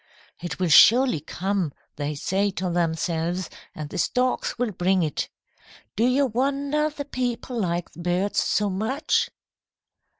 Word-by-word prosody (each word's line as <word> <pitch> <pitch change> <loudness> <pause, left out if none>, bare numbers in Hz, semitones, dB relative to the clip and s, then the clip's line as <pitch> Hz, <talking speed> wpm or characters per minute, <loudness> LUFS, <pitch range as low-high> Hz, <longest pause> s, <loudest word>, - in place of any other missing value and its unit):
"'It 175 0 -4
will 185 - 0
surely 240 - +6
come,' 190 +1 -2 0.2
they 145 +1 -3
say 195 +7 0
to 185 -1 -3
themselves, 170 +1 -1 0.2
'and 150 -1 -6
the - - -4
storks 250 +7 0
will 245 -2 0
bring 185 0 +1
it.' 150 -2 -2 0.7
Do 225 - +2
you 270 +3 +3
wonder 280 +5 0
the 290 -1 -6
people 250 -2 -3
like 175 -3 -2
the - - -15
birds 180 +3 0
so 205 -1 +1
much?" 220 - 0
195 Hz, 140 wpm, -24 LUFS, 175-250 Hz, 0.7 s, surely